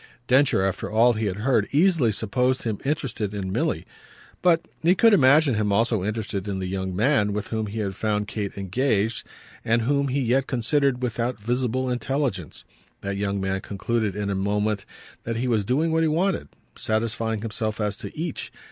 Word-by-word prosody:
Densher, 130 Hz, -6 st, +4 dB
after 95 Hz, -1 st, -2 dB
all 115 Hz, +3 st, +4 dB
he 110 Hz, -1 st, -1 dB
had 95 Hz, -, -2 dB
heard, 110 Hz, 0 st, +1 dB
easily 155 Hz, -, +3 dB
supposed 125 Hz, +5 st, 0 dB
him 110 Hz, -4 st, -2 dB
interested 125 Hz, -8 st, -2 dB
in 95 Hz, -2 st, -3 dB
Milly; -, -, -1 dB, 0.6 s
but 170 Hz, -2 st, +3 dB, 0.2 s
he 175 Hz, +3 st, +4 dB
could 225 Hz, +3 st, +5 dB
imagine 145 Hz, -3 st, +5 dB
him 105 Hz, -2 st, 0 dB
also 110 Hz, -1 st, +2 dB
interested 105 Hz, -2 st, -3 dB
in 100 Hz, -1 st, -2 dB
the 95 Hz, -, -3 dB
young 95 Hz, 0 st, -3 dB
man 105 Hz, -2 st, +2 dB
with 105 Hz, 0 st, -3 dB
whom 110 Hz, -1 st, -2 dB
he 105 Hz, +2 st, -6 dB
had 100 Hz, -2 st, -2 dB
found 105 Hz, 0 st, -1 dB
Kate 100 Hz, -1 st, -4 dB
engaged 110 Hz, +2 st, 0 dB, 0.4 s
and 115 Hz, +1 st, +2 dB
whom 140 Hz, +3 st, +1 dB
he 135 Hz, +2 st, 0 dB
yet 130 Hz, +1 st, +1 dB
considered 130 Hz, +1 st, +1 dB
without 120 Hz, 0 st, -1 dB
visible 125 Hz, +3 st, -1 dB
intelligence. 125 Hz, -, -2 dB, 0.4 s
That 100 Hz, 0 st, -3 dB
young 100 Hz, 0 st, -1 dB
man 95 Hz, 0 st, -1 dB
concluded 105 Hz, 0 st, -2 dB
in 100 Hz, -1 st, -2 dB
a -, -, -1 dB
moment 105 Hz, +1 st, 0 dB, 0.4 s
that 115 Hz, -, -3 dB
he 120 Hz, +3 st, -1 dB
was 110 Hz, -4 st, +2 dB
doing 145 Hz, +10 st, +1 dB
what 160 Hz, 0 st, +2 dB
he 160 Hz, -, +3 dB
wanted, 170 Hz, -, 0 dB, 0.3 s
satisfying 110 Hz, 0 st, -1 dB
himself 110 Hz, -1 st, -3 dB
as 105 Hz, -1 st, 0 dB
to -, -, -8 dB
each. 160 Hz, -1 st, -4 dB
115 Hz, 185 wpm, -24 LUFS, 100-130 Hz, 0.6 s, could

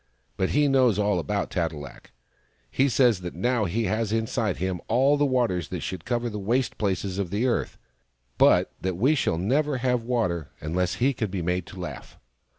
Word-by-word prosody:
But 95 Hz, -, 0 dB
he 145 Hz, 0 st, +3 dB
knows 130 Hz, -6 st, +3 dB
all 105 Hz, -3 st, +1 dB
about 80 Hz, -, -2 dB
Tat 85 Hz, -3 st, 0 dB
e -, -, -9 dB
lak. 70 Hz, -3 st, -10 dB, 0.6 s
He 135 Hz, +1 st, +2 dB
says 120 Hz, -5 st, +3 dB
that 90 Hz, -1 st, -6 dB
now 120 Hz, +4 st, +1 dB
he 105 Hz, +6 st, -1 dB
has 110 Hz, -1 st, -1 dB
inside 110 Hz, -2 st, -1 dB
him 95 Hz, -1 st, -2 dB
all 135 Hz, +5 st, +4 dB
the 145 Hz, 0 st, +2 dB
waters 120 Hz, -, 0 dB
that -, -, -5 dB
should 90 Hz, -2 st, -5 dB
cover 120 Hz, 0 st, -1 dB
the 105 Hz, -2 st, -4 dB
waste 120 Hz, +5 st, -1 dB
places 95 Hz, -1 st, -1 dB
of 95 Hz, -3 st, -2 dB
the 105 Hz, +6 st, 0 dB
earth, 125 Hz, -, -1 dB, 0.6 s
but -, -, +5 dB
that 95 Hz, -2 st, -2 dB
we 130 Hz, +10 st, +3 dB
shall 90 Hz, -, 0 dB
never 135 Hz, -, +1 dB
have 125 Hz, -1 st, +1 dB
water 110 Hz, -, -1 dB
unless 90 Hz, +4 st, -1 dB
he 135 Hz, +3 st, +2 dB
can 110 Hz, -4 st, -2 dB
be 95 Hz, -2 st, -3 dB
made 90 Hz, 0 st, -1 dB
to 95 Hz, -, -10 dB
laugh 90 Hz, -, -8 dB
105 Hz, 200 wpm, -26 LUFS, 90-125 Hz, 0.6 s, but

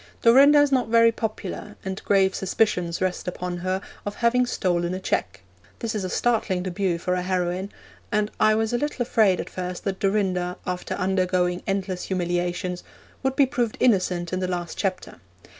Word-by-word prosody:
Dorinda 275 Hz, +5 st, +7 dB
is 290 Hz, -1 st, +4 dB
not 255 Hz, -4 st, +2 dB
very 230 Hz, 0 st, +5 dB
popular, 215 Hz, -2 st, -5 dB
and 190 Hz, 0 st, -4 dB
grave 195 Hz, -1 st, +3 dB
suspicions 180 Hz, -3 st, 0 dB
rest 185 Hz, -1 st, -2 dB
upon 180 Hz, 0 st, -3 dB
her 185 Hz, +2 st, -2 dB, 0.2 s
of 205 Hz, -, -4 dB
having 245 Hz, +1 st, +2 dB
stolen 175 Hz, -5 st, 0 dB
a -, -, -4 dB
cheque. 100 Hz, -, -2 dB, 0.4 s
This 230 Hz, -1 st, -3 dB
is 210 Hz, -3 st, -2 dB
a 185 Hz, -, -3 dB
startling 215 Hz, -5 st, 0 dB
debut 185 Hz, -1 st, -1 dB
for 180 Hz, +2 st, -2 dB
a 180 Hz, -, 0 dB
heroine, 180 Hz, +1 st, -1 dB, 0.4 s
and 210 Hz, 0 st, +1 dB
I 215 Hz, 0 st, +5 dB
was 220 Hz, +1 st, 0 dB
a 240 Hz, -, +1 dB
little 295 Hz, -3 st, -1 dB
afraid 215 Hz, -6 st, +3 dB
at -, -, -4 dB
first 180 Hz, -1 st, -5 dB
that 195 Hz, -1 st, -3 dB
Dorinda, 185 Hz, -3 st, 0 dB
after 180 Hz, 0 st, -3 dB
undergoing 185 Hz, -1 st, 0 dB
endless 195 Hz, -2 st, -2 dB
humiliations, 175 Hz, 0 st, -2 dB, 0.4 s
would 265 Hz, 0 st, 0 dB
be 280 Hz, -, +5 dB
proved 245 Hz, -4 st, -2 dB
innocent 185 Hz, -6 st, +2 dB
in 185 Hz, -, 0 dB
the 185 Hz, -, -1 dB
last 175 Hz, -2 st, -3 dB
chapter. 190 Hz, -2 st, -3 dB
190 Hz, 175 wpm, -24 LUFS, 180-220 Hz, 0.4 s, Dorinda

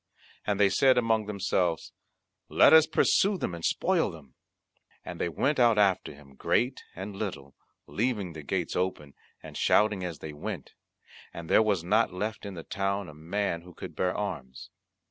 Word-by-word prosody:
And 105 Hz, -1 st, 0 dB
they 100 Hz, -1 st, +5 dB
said 130 Hz, +4 st, +4 dB
among 110 Hz, -3 st, +1 dB
themselves, 95 Hz, -5 st, -1 dB, 0.6 s
"Let -, -, +6 dB
us 160 Hz, -1 st, +8 dB
pursue 200 Hz, 0 st, +3 dB
them 90 Hz, -, -3 dB
and 85 Hz, -1 st, -8 dB
spoil -, -, +1 dB
them." 70 Hz, -6 st, -13 dB, 0.7 s
And -, -, -7 dB
they -, -, 0 dB
went 135 Hz, -, 0 dB
out 120 Hz, -3 st, +5 dB
after 95 Hz, -3 st, +2 dB
him, 70 Hz, -1 st, -16 dB
great 125 Hz, -, 0 dB
and 95 Hz, +2 st, -7 dB
little, 90 Hz, -10 st, -5 dB, 0.3 s
leaving 105 Hz, -6 st, -2 dB
the 80 Hz, -, -8 dB
gates 85 Hz, +4 st, -3 dB
open 90 Hz, -6 st, -2 dB, 0.3 s
and -, -, -10 dB
shouting 105 Hz, -3 st, +2 dB
as 85 Hz, -4 st, -4 dB
they 75 Hz, +1 st, -8 dB
went; 75 Hz, -, -6 dB, 0.6 s
and 85 Hz, -1 st, -7 dB
there -, -, +6 dB
was 105 Hz, -6 st, +1 dB
not 110 Hz, +6 st, +2 dB
left 105 Hz, +3 st, -4 dB
in 100 Hz, -, -7 dB
the 80 Hz, -, -7 dB
town 100 Hz, -1 st, -2 dB
a -, -, -11 dB
man 85 Hz, +3 st, -2 dB
who 90 Hz, -1 st, -15 dB
could -, -, -9 dB
bear 90 Hz, 0 st, -1 dB
arms. 65 Hz, -11 st, -6 dB
95 Hz, 175 wpm, -28 LUFS, 85-105 Hz, 0.7 s, us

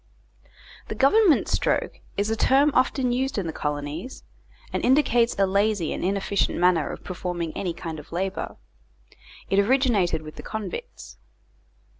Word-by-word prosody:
"The -, -, -5 dB
Government 340 Hz, +4 st, +4 dB
Stroke" -, -, 0 dB, 0.2 s
is 205 Hz, +2 st, 0 dB
a -, -, +1 dB
term 275 Hz, +6 st, +4 dB
often 255 Hz, 0 st, +2 dB
used 260 Hz, +1 st, -1 dB
in 200 Hz, -, -1 dB
the 160 Hz, -, -4 dB
colonies, 150 Hz, -, -4 dB, 0.5 s
and -, -, -1 dB
indicates 245 Hz, -3 st, +3 dB
a 195 Hz, -, +4 dB
lazy 200 Hz, -2 st, +1 dB
and -, -, -5 dB
inefficient 195 Hz, +1 st, 0 dB
manner 175 Hz, -3 st, +3 dB
of -, -, -9 dB
performing 175 Hz, -2 st, -4 dB
any 175 Hz, -3 st, -3 dB
kind 165 Hz, -3 st, -6 dB
of 150 Hz, -, -14 dB
labour. 190 Hz, +3 st, -3 dB, 0.9 s
It 195 Hz, -, +4 dB
originated 205 Hz, -, +2 dB
with 155 Hz, 0 st, -10 dB
the -, -, -6 dB
convicts. 190 Hz, -, -7 dB
195 Hz, 145 wpm, -25 LUFS, 170-250 Hz, 0.9 s, Government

